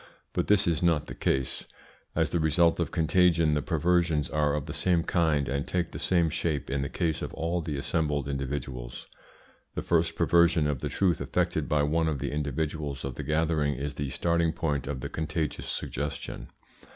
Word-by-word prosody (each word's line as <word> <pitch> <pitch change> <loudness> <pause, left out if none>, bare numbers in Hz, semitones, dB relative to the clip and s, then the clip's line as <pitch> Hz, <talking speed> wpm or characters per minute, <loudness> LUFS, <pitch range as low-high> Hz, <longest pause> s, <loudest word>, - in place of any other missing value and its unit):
But - - 0
this 105 0 +4
is 85 -3 +1
not 85 -4 +2
the - - -7
case. 65 -1 0 0.5
As 80 -3 +1
the 85 - +1
result 80 +2 +3
of 85 -3 0
contagion 85 -1 +3
the 75 - +1
perversions 85 -1 +1
are 75 -1 +2
of 75 -2 -3
the 75 - -6
same 85 -1 +2
kind, 80 -6 +1
and 70 +1 -2
take 90 -1 -1
the - - -6
same 85 -3 +2
shape 75 -4 -2
in 70 0 0
the 70 - -2
case 80 -3 -1
of - - -4
all 85 +2 -1
the 75 -3 -3
assembled 75 -1 -1
individuals. 65 -3 -4 0.7
The - - -2
first 85 -1 +2
perversion 85 -2 +4
of 75 -3 0
the - - -3
truth 90 -6 +1
effected - - 0
by 75 -1 +3
one 80 +2 +1
of 75 -3 0
the - - -3
individuals 75 -1 -2
of 70 - -3
the 70 - -6
gathering 75 0 +1
is 70 +3 -4
the 70 -1 -3
starting 85 +3 +1
point 70 -5 -1
of 70 -2 -3
the - - -3
contagious 80 -1 -3
suggestion. 70 +2 -4
75 Hz, 190 wpm, -28 LUFS, 70-85 Hz, 0.7 s, this